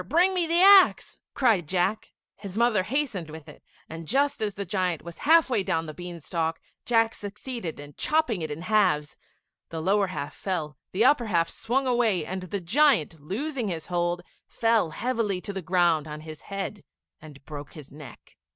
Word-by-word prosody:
bring 355 +5 +4
me 355 -3 0
the 335 +1 +2
axe," 390 -1 +6
cried 220 - +2
Jack. 185 +5 0 0.2
His 200 -1 -8
mother 235 -4 +3
hastened 225 - -2
with 155 -1 -10
it, - - -13 0.3
and 160 0 -8
just 280 - +1
as 205 -2 -1
the 200 - -4
giant 185 -4 -1
was 170 0 -10
half 330 0 +7
way 240 -6 +1
down 165 -3 -1
the 155 - -7
bean 175 0 -8
stalk, 165 +1 -2 0.3
Jack 225 -1 +3
succeeded 210 - -6
in 145 0 -10
chopping 300 - +1
it 155 - -3
in 150 +3 -6
halves; 185 -8 +2 0.5
the 165 - -5
lower 195 +4 +2
half 145 -6 -5
fell; 160 -6 -3 0.2
the 210 +6 +2
upper 255 -4 +4
half 170 -4 +1
swung 265 +4 -1
away, 230 -9 +1
and 190 0 -4
the 185 +2 -4
giant, 180 - +2
losing 240 - -3
his 165 -4 -4
hold, 175 0 0 0.2
fell 225 -6 +1
heavily 220 0 -1
to 200 - -5
the 190 - -4
ground 170 -3 +2
on 150 0 -7
his 155 -1 -9
head 200 0 -4 0.4
and 145 -3 -14
broke 145 -2 -8
his 150 -4 -11
neck. 150 -1 -13
190 Hz, 185 wpm, -26 LUFS, 165-235 Hz, 0.5 s, half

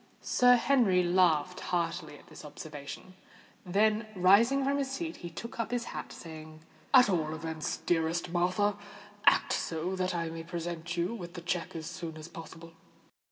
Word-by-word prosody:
Sir 245 0 +5
Henry 235 -8 +3
laughed 175 -2 +2
heartily 165 -3 -2
at - - -18
this - - -12
observation; 150 +4 -9 0.5
then, 210 +3 +2
rising 215 +9 +5
from 280 +1 +1
his 275 -1 -1
seat, 320 +5 -4
he 175 - -7
took 230 +9 -8
up 230 - -1
his 245 -1 -1
hat, - - -6
saying, 155 -1 -10 0.3
"At 255 -4 +8
all 160 -5 0
events, 160 -1 -4
dearest 165 +1 0
Martha, 185 +4 +1 0.5
act - - +5
so 170 +3 -2
that 185 -1 -1
I 165 -1 -2
may 165 0 -6
present 170 0 -5
you 175 +6 0
with 175 -5 -8
the 175 - -6
cheque 175 0 -3
as 160 -1 -5
soon 170 -2 -6
as 155 +1 -8
possible." 165 0 -11
175 Hz, 165 wpm, -30 LUFS, 165-205 Hz, 0.5 s, At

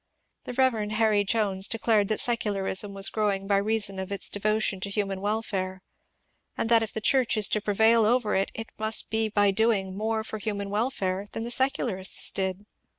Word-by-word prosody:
The - - -6
Rev. 240 -5 +1
Harry 215 -2 +2
Jones 200 -2 +1
declared 220 -2 +1
that 215 - 0
secularism 205 -3 0
was 195 0 +3
growing 205 -3 -1
by 200 0 +2
reason 205 -1 0
of 190 +1 -6
its 200 - 0
devo 215 +2 0
tion 195 -3 -1
to 200 - -4
human 195 -2 -2
welfare, 195 -3 -3 0.7
and 225 - -1
that 230 -1 +5
if 220 - -3
the - - -4
Church 250 0 +2
is 210 - +4
to 215 - 0
prevail 220 +2 +3
over 225 0 +1
it, 195 - +1
it 225 0 -7
must 220 0 +1
be 220 0 0
by 205 -1 +3
doing 195 -3 0
more 220 +2 -2
for 220 0 -7
human 200 -1 -4
welfare 205 -4 -2
than 225 - -4
the 235 - -4
secularists 240 -7 +1
did. 190 +1 -3
210 Hz, 190 wpm, -26 LUFS, 195-225 Hz, 0.7 s, that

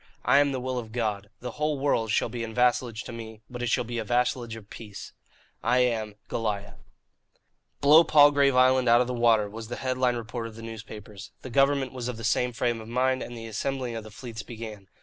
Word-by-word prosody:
I 135 +3 +6
am 145 -1 +3
the 130 - -2
will 130 0 -2
of 110 -2 -8
God. 105 -4 -2
The 125 0 -5
whole 150 +3 -1
world 135 -5 +1
shall 110 - +2
be 115 0 -5
in 115 -1 -6
vassalage 125 -2 +1
to - - -8
me, 110 -2 -9
but 125 0 -6
it 120 - -1
shall 125 +2 +2
be 120 0 -4
a - - -2
vassalage 120 0 0
of 110 -2 -11
peace. 105 -3 -9 0.5
"I 125 - +2
am 110 -4 0
"GOLIAH." 105 -3 -3 1.0
"Blow 150 +4 +8
Palgrave 145 -3 +5
Island 130 -1 +4
out 120 +1 +6
of - - +2
the 125 - -3
water!" 115 -3 +3
was 110 +2 -8
the 120 - -5
head 130 -1 -2
line 125 -1 +3
retort 115 0 -5
of 110 - -11
the 115 - -10
newspapers. 110 -2 -9
The 130 - -7
government 135 0 +2
was 125 -2 -4
of 125 -2 -4
the 115 - -8
same 125 +3 +1
frame 120 0 -1
of 110 - -10
mind, 130 +2 +1
and 120 - -6
the 115 - -7
assembling 125 +2 -3
of 115 - -5
the 110 - -10
fleets 115 +1 -8
began. 110 -4 -9
120 Hz, 230 wpm, -27 LUFS, 110-130 Hz, 1.0 s, Blow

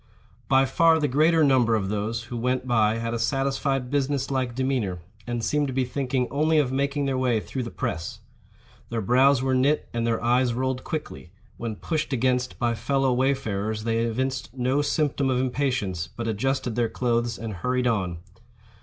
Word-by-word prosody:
By 135 0 +4
far 160 +4 +4
the 150 - +1
greater 155 +4 +3
number 125 -5 +4
of 95 -3 -1
those 110 +3 -2
who 120 - -7
went 125 +2 -1
by 110 -3 +2
had 115 0 -3
a 115 - -2
satisfied 135 +1 0
business 140 -1 0
like 130 -3 -1
demeanor, 130 -8 -1 0.3
and 120 -1 -2
seemed 150 +2 +1
to 130 - -4
be 130 0 +1
thinking 125 -1 -1
only 155 +3 +2
of 140 -4 +2
making 140 +1 0
their 135 -1 0
way 125 -3 +2
through 130 +4 -5
the 120 - -4
press. 80 -6 -4 0.7
Their 115 - -2
brows 130 +5 +4
were 130 0 +1
knit, 135 +4 +2
and 115 0 -1
their 115 -1 +1
eyes 120 0 +2
rolled 130 0 -1
quickly; 155 - -5 0.3
when 115 -2 -4
pushed 155 +3 -2
against 125 0 0
by 120 -1 +1
fellow 135 +2 +1
wayfarers 110 -5 -1
they 115 0 0
evinced 130 +3 -1
no 130 +3 +1
symptom 145 -2 0
of 125 -1 +1
impatience, 125 -10 -1
but 115 +6 -6
adjusted 120 +2 -1
their 120 -2 +1
clothes 120 -2 0
and 110 -1 -5
hurried 125 +6 0
on. 95 -8 0
125 Hz, 180 wpm, -25 LUFS, 115-135 Hz, 0.7 s, By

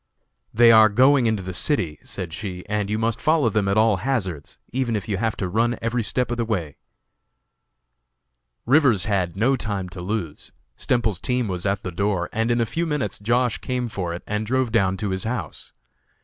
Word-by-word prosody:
"They 115 +1 +6
are 110 -1 +7
going 130 +3 +4
into 110 -4 0
the 95 0 -5
city," 90 - 0
said 90 -4 -6
she, 90 -1 -6
"and 105 -1 -1
you 105 - 0
must 115 0 -1
follow 155 -6 +3
them 100 -1 0
at 100 +2 +1
all 110 -2 +4
hazards, 95 - -3 0.2
even 125 -3 0
if 105 - -4
you 100 -3 -1
have 110 +2 -1
to 95 - -2
run 115 +6 +1
every 115 +1 -1
step 125 +3 -1
of 120 - -2
the 120 - 0
way." 90 - -3 1.9
Rivers 130 - +4
had 95 -5 -1
no 125 +6 +3
time 100 -7 -3
to 90 0 -8
lose. 90 -5 -4 0.2
Stemples's 110 -7 0
team 125 -2 0
was 90 0 -3
at 100 0 -1
the 90 - -4
door, 95 -1 -1
and 115 +1 0
in 120 0 +2
a 115 - +2
few 165 +9 -2
minutes 150 -3 -2
Josh. 120 +3 +1
came 125 -1 -2
for 90 -5 -4
it 85 - -6
and 105 +1 -2
drove 130 0 0
down 95 -4 +2
to 100 +1 -3
his 95 0 -2
house. 110 - -5
110 Hz, 200 wpm, -23 LUFS, 95-120 Hz, 1.9 s, are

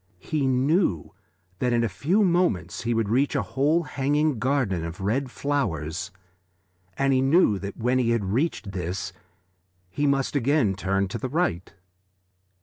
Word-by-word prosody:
He 145 - -1
knew 130 - +1 0.5
that 125 -1 +1
in 120 0 +2
a - - +2
few 165 - +1
moments 170 - +1
he 120 0 -1
would 115 -2 +1
reach 130 +7 +1
a - - +1
whole 150 +5 +1
hanging 145 -1 0
garden 125 -9 0
of 85 +1 -6
red 120 +8 -1
flowers, 90 - -2 0.9
and 135 0 +2
he 130 - +3
knew 135 - +3
that 100 +1 -6
when 125 +2 +1
he 120 -2 +1
had 115 -4 +1
reached 110 - -1
this 90 +1 -4 0.8
he 145 +7 0
must 140 0 0
again 135 -5 +2
turn 100 0 0
to 115 - -4
the 130 - -3
right. 130 - -1
125 Hz, 155 wpm, -25 LUFS, 100-145 Hz, 0.9 s, he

